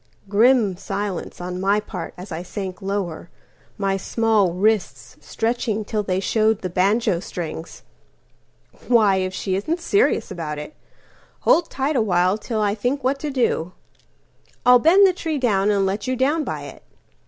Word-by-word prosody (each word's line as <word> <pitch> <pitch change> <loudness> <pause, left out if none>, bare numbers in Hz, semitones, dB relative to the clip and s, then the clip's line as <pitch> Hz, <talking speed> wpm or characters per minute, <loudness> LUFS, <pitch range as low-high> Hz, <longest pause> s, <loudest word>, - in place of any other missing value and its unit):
Grim 215 -1 +3
silence 195 -1 -4
on 180 +1 -5
my 200 +2 +2
part 195 -4 -7
as 185 +2 -10
I 160 +1 -4
sank 190 +1 -6
lower, 190 -4 -3 0.5
My 195 -1 0
small 215 -2 +1
wrists 210 +2 0
stretching 225 -2 -2
till 215 0 -1
they 190 -2 -1
showed 220 +2 +1
the 185 - -3
banjo 195 +1 +2
strings."Why, 190 +5 -3
if 185 0 -1
she 190 0 -3
isn't 310 - -2
serious 400 +6 +1
about 155 -3 -4
it! 150 - -7 0.7
Hold 335 -1 +3
tight 280 +3 -1
awhile 190 -3 +2
till 220 -1 -3
I 205 -1 +1
think 245 +6 -2
what 270 +2 0
to 300 - -3
do. 230 - 0 0.9
I'll 250 0 +7
bend 365 +9 +6
the 375 - +4
tree 325 -3 -3
down 210 -6 +1
and 200 -2 +2
let 200 +3 -2
you 255 - 0
down 285 +5 +1
by - - -5
it." - - -10
205 Hz, 155 wpm, -22 LUFS, 185-245 Hz, 0.9 s, I'll